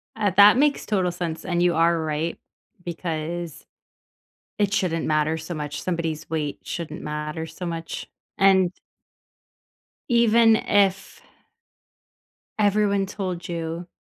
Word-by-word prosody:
Ah, 210 -3 +1
that 205 +4 +8
makes 290 +1 +2
total 185 -4 0
sense. 170 -2 -4
And 175 -1 0
you 175 -1 +3
are 165 +1 +3
right 160 +1 -2 0.5
because 170 -1 -5 0.9
it 205 -1 +1
shouldn't 165 -5 0
matter 155 +1 +1
so 160 +2 -6
much, 150 -2 -5
somebody's 165 -4 -3
weight 150 -3 -2
shouldn't 165 -2 -6
matter 150 +1 -4
so 160 +3 -8
much. 165 -1 -5 0.3
And 190 -2 +4 1.4
even 230 -1 +5
if 195 -1 +1 1.4
everyone 205 -1 +2
told 185 -3 -5
you, 170 0 -4
175 Hz, 115 wpm, -24 LUFS, 160-195 Hz, 1.4 s, that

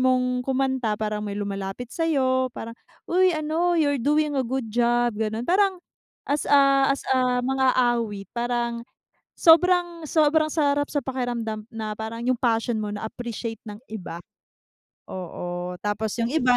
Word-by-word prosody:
mong 250 -1 +2
kumanta, 260 -5 0
parang 210 -1 -2
may 205 -1 -4
lumalapit 200 +4 -5
sa'yo, 260 -6 +1
parang, 230 - -6 0.3
"Uy, 370 +1 +3
ano, 325 +3 0
you're 285 -4 +2
doing 300 +3 +2
a 270 - +2
good 255 0 -2
job", 240 0 +2
gano'n. 220 +2 -2
Parang 385 +3 +3 0.5
as 285 +1 -1
a, 275 -1 +5
as 275 - 0
a, 250 -1 +1
mang-aawit, 240 -6 +1
parang 235 -1 -1 0.6
sobrang, 345 -1 +4
sobrang 310 0 +3
sarap 290 -2 +2
sa 290 - 0
pakiramdam, 235 -4 -3
na 220 -1 -4
parang 225 +2 -6
yung 255 -1 +1
passion 230 -1 +1
mo, 210 - -3
na-appreciate 225 +1 -5
ng 205 0 -7
iba. 180 -5 -6 0.9
Oo, 180 0 -5
tapos 210 +1 -1
yung 235 +3 -1
iba, 250 -5 +4
245 Hz, 140 wpm, -24 LUFS, 220-285 Hz, 0.9 s, a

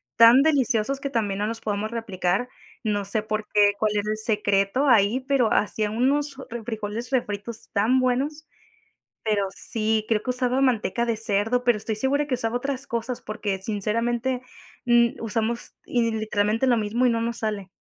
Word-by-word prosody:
tan 235 +4 +8
deliciosos 275 -3 +1
que 280 - -2
también 210 -6 -1
no 210 - 0
los 225 +1 -4
podemos 215 0 -3
replicar. 200 -1 -1 0.4
No 205 -2 0
sé 200 +2 -1
por 215 0 -3
qué, 205 -1 +5
cuál 215 0 +1
era 205 +1 -1
el 215 - -1
secreto 210 +3 +1
ahí, 225 0 +4
pero 260 -4 +1
hacía 210 0 +1
unos, 275 +4 +1
eh, 265 - -6
refrijoles 225 0 -5
refritos 225 -2 -3
tan 225 +6 +3
buenos. 275 +5 -1 0.8
Pero 210 -2 +1
sí 220 -1 -1
creo 220 -2 +2
que 255 - -2
usaba 250 +1 0
manteca 235 -3 +1
de 230 - 0
cerdo, 225 +3 0
pero 240 -3 +3
estoy 220 +1 -3
segura 270 +6 0
que 275 - -1
usaba 240 -1 -1
otras 275 +2 -3
cosas 235 +1 -3
porque 210 -2 -3
sinceramente, 230 +5 -1 0.4
mm, 235 -1 +3
usamos 225 +1 -2
y 235 -2 +1
literalmente 215 +2 0
lo 245 -2 +4
mismo 230 +3 +1
y - - +4
no 230 -1 0
nos 235 +1 -2
sale. 210 -3 -3
230 Hz, 175 wpm, -24 LUFS, 210-250 Hz, 0.8 s, tan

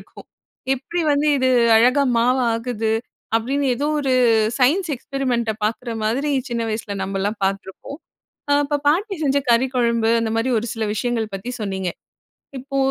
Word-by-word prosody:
இருக்கும். - - -15 0.5
எப்பிடி 340 +7 -4
வந்து 290 +1 +1
இது 260 0 +2 0.3
அழகா 250 +5 +4 0.2
மாவாகுது? 230 -2 0 0.4
அப்பிடின்னு 270 +5 0
ஏதோ 285 +4 -2
ஒரு 270 -2 0 0.5
சயின்ஸ் 330 +9 +2
எக்ஸ்பெரிமெண்ட்ட 245 -4 -2
பார்க்குற 230 +3 -2
மாதிரி, 270 +7 0 0.2
சின்ன 235 -1 -1
வயசுல 215 -2 -4
நம்மல்லாம் 195 +2 -2
பார்த்துருப்போம். 195 - -4 0.5
அ - - +6
இப்ப 290 0 0
பாட்டி 390 +7 +1
செஞ்ச 280 0 +2
கறி 235 +2 +4
குழம்பு, 235 -2 +2
அந்தமாரி 225 +2 -1
ஒரு 235 - -5
சில 225 -1 -3
விஷயங்கள் 225 -2 -2
பத்தி 195 +6 -5
சொன்னீங்க. 190 -3 -2 0.7
இப்போ 275 +1 -5
240 Hz, 140 wpm, -21 LUFS, 220-275 Hz, 0.7 s, அ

